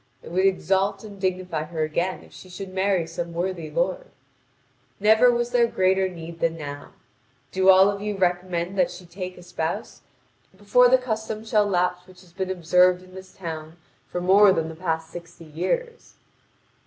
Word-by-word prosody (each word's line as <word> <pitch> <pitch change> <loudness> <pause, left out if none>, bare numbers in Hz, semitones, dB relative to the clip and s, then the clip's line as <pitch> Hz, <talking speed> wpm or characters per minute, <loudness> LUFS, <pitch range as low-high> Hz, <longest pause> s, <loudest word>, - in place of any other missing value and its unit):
It - - -10
would 185 +2 +3
exalt 195 +1 0
and 200 -3 -11
dignify 180 -4 -2
her 160 -1 -3
again 170 +4 -2
if - - -18
she 185 - -13
should 185 +1 -8
marry 190 -2 +1
some 170 +1 -6
worthy 175 -1 -3
lord. - - -1 0.9
Never 220 +4 +5
was 240 0 0
there 240 -1 +4
greater 190 -2 +1
need 170 -1 -9
than 165 0 0
now; 145 -2 -8 0.6
do 190 0 +3
all 190 +1 +8
of 200 0 -2
you 210 -1 -3
recommend 180 0 -1
that 180 - +3
she 180 0 -11
take 180 +1 -7
a 180 - -12
spouse, 170 -2 -4 0.6
before 225 +5 +4
the 260 - +6
custom 220 -3 -4
shall 210 -2 +2
lapse 180 -1 0
which 185 -1 -17
has 175 -2 -20
been 190 0 -3
observed 180 0 +3
in 185 0 -17
this 190 0 -11
town 160 -2 -7 0.3
for 180 - -4
more 195 +3 +6
than 165 -3 -1
the 160 - -8
past 160 -1 -3
sixty 170 -1 -11
years." 455 - -4
185 Hz, 180 wpm, -24 LUFS, 170-200 Hz, 0.9 s, all